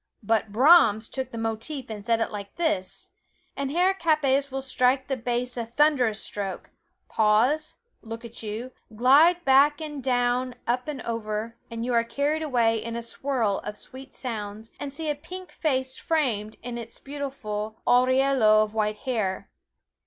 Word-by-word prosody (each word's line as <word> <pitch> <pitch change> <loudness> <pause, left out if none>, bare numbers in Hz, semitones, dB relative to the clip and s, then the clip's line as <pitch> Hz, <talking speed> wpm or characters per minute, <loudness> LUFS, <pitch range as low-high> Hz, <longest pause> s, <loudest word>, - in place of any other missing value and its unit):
"But 220 0 +1
Brahms 230 -3 +6
took 260 -2 -4
the 230 - -8
motif 225 +5 -4
and 215 -2 -7
set 230 +1 +1
it 225 - -1
like 200 -2 -7
this" 320 - -2 0.5
and 280 -1 -2
Herr 360 +6 +3
Kappes 285 -6 +2
will 270 0 -3
strike 260 0 +1
the 270 - 0
bass 245 0 -2
a 235 - -1
thunderous 245 -2 +2
stroke 200 -3 -4 0.4
pause, 240 +9 +2 0.3
look 225 +1 -8
at 235 - -9
you, 225 +4 -5 0.2
glide 305 +9 +5
back 280 +2 +5
and 295 -4 -6
down, 245 0 +1
up 250 +3 -1
and 290 -4 -5
over, 225 0 -3
and 230 0 -4
you 250 - -1
are 230 -1 +4
carried 285 +6 -1
away 235 -7 +1
in 230 0 -5
a 235 - -3
swirl 235 -4 -1
of 210 0 -6
sweet 265 +1 -11
sounds, 220 -3 -6
and 285 - -5
see 315 +3 -5
a 300 - +2
pink 360 +5 -10
face 260 -4 -1
framed 235 -10 -1
in 240 0 -5
its 230 0 -8
beautiful 235 -7 -5
aureole 260 +2 +3 0.2
of 215 0 -5
white 215 -1 0
hair. 215 -7 -2
250 Hz, 165 wpm, -26 LUFS, 225-280 Hz, 0.5 s, Brahms